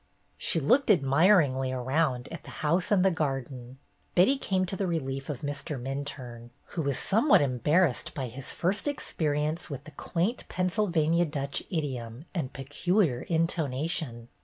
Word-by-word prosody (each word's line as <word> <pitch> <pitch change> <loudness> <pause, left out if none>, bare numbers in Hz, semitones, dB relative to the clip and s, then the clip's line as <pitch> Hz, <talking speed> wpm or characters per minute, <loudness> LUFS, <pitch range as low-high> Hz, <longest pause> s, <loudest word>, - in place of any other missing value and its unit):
She 165 - +4
looked 245 - +3
admiringly 140 -5 +4
around 130 0 0
at 165 -3 -8
the - - -11 0.2
house 170 +4 +2
and 195 -3 +3
the 190 - +5
garden. 135 -5 -3 0.4
Betty 190 +10 +5
came 190 -8 0
to 190 +2 -3
the 190 0 -1
relief 135 -5 -3
of 140 -5 -4
Mr. 145 0 -4
Minturne, 130 -3 -6 0.2
who 170 - -3
was 140 -3 0
somewhat 225 +9 +4
embarrassed 145 +3 +1
by 135 - -2
his 125 +3 -6
first 195 - -1
experience 155 - -1
with 140 -2 -6
the 155 - -12
quaint 175 - -2
Pennsylvania 175 -3 +1
Dutch 140 -3 -2
idiom 130 -5 -4
and 160 -9 -2
peculiar 145 - 0
intonation. 155 -6 -1
150 Hz, 145 wpm, -28 LUFS, 135-175 Hz, 0.4 s, the